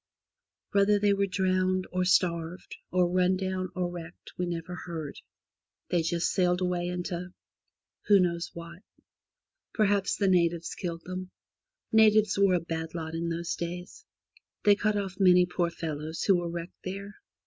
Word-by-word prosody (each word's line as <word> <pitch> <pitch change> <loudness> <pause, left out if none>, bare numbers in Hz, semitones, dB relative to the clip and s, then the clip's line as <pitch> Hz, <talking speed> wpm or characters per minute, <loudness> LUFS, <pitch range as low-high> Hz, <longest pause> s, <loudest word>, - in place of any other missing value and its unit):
Whether 200 +1 +4
they 205 0 +3
were 200 0 +1
drowned, 185 0 +1
or 185 0 0
starved, 175 -1 0
or 180 -1 +3
run 185 +1 +2
down, 185 -1 -2
or 180 -1 0
wrecked, 170 -1 -9
we 180 - -2
never 170 +1 -4
heard. 160 -4 -5 0.7
They 175 - +2
just 170 +1 0
sailed 180 -1 +2
away 180 -1 -1
into 180 0 -4 0.3
— - - -37
who 205 -2 +7
knows 170 -2 0
what? 170 +2 -9 0.9
Perhaps 205 -2 +2
the 200 - +1
natives 170 -2 +2
killed 170 -2 -5
them. 185 0 -5 0.6
Natives 215 -1 +5
were 195 -2 +5
a - - +2
bad 165 0 -5
lot 160 -1 -4
in 165 +1 -2
those 170 +1 -2
days. 175 +1 -6 0.6
They 205 - +7
cut 210 +1 +1
off 195 -1 -4
many 180 -2 +6
poor 175 -1 -1
fellows 160 -1 -4
who 195 - +5
were 175 -1 -3
wrecked 170 +1 -7
there. 200 +2 -6
180 Hz, 160 wpm, -28 LUFS, 170-190 Hz, 0.9 s, who